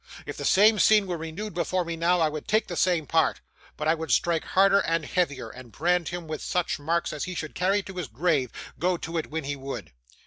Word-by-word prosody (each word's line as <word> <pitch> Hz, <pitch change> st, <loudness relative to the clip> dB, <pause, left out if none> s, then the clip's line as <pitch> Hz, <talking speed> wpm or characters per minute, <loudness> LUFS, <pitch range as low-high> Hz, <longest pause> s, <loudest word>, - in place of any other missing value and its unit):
If -, -, -6 dB
the -, -, -5 dB
same 210 Hz, +2 st, +5 dB
scene 215 Hz, -2 st, +5 dB
were 180 Hz, -2 st, -3 dB
renewed 165 Hz, +6 st, -6 dB
before 180 Hz, +1 st, -1 dB
me 165 Hz, 0 st, -3 dB
now, 170 Hz, +1 st, +2 dB
I 160 Hz, -, +4 dB
would 155 Hz, 0 st, -6 dB
take 215 Hz, +1 st, +2 dB
the 175 Hz, -, -6 dB
same 175 Hz, -3 st, +2 dB
part; 160 Hz, +2 st, +2 dB, 0.4 s
but 150 Hz, -, -2 dB
I 160 Hz, -, +5 dB
would 160 Hz, -1 st, -5 dB
strike 165 Hz, +6 st, +2 dB
harder 195 Hz, +1 st, +4 dB
and 165 Hz, -4 st, 0 dB
heavier, 145 Hz, -11 st, -1 dB
and 125 Hz, -2 st, -12 dB
brand 175 Hz, +4 st, +1 dB
him 175 Hz, -1 st, -6 dB
with 155 Hz, -1 st, -5 dB
such 180 Hz, -3 st, -1 dB
marks 165 Hz, +3 st, -1 dB
as 150 Hz, -, -3 dB
he 185 Hz, -, -5 dB
should 155 Hz, -2 st, -5 dB
carry 195 Hz, +3 st, +1 dB
to 190 Hz, -, -9 dB
his 175 Hz, -5 st, -3 dB
grave, 135 Hz, +1 st, 0 dB, 0.3 s
go 180 Hz, +1 st, +1 dB
to 165 Hz, 0 st, -3 dB
it 155 Hz, -, -5 dB
when 160 Hz, 0 st, -4 dB
he 140 Hz, +1 st, -3 dB
would. 135 Hz, 0 st, -7 dB
170 Hz, 240 wpm, -26 LUFS, 155-180 Hz, 0.4 s, same